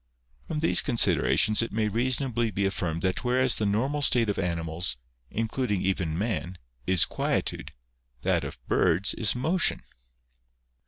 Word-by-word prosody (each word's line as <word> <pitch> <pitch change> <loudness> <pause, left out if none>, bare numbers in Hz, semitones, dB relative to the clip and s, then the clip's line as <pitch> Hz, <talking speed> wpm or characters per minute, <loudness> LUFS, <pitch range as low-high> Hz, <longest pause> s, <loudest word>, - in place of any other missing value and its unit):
From 155 -1 -3
these 165 - +4
considerations 115 -4 +3
it 115 - -3
may 110 0 0
reasonably 120 +1 0
be 100 -1 -2
affirmed 85 -4 -2
that 95 0 -1
whereas 130 0 +2
the 105 - 0
normal 130 +9 0
state 120 -5 +3
of - - -5
animals, 85 -4 -2 0.3
including 110 -2 -2
even 90 -4 -1
man, 95 -3 -3 0.3
is 95 -3 +4
quietude, - - -2 0.5
that - - +1
of - - -7
birds 90 +2 +2
is 110 0 +1
motion. 165 +9 +1
110 Hz, 140 wpm, -26 LUFS, 95-125 Hz, 0.5 s, these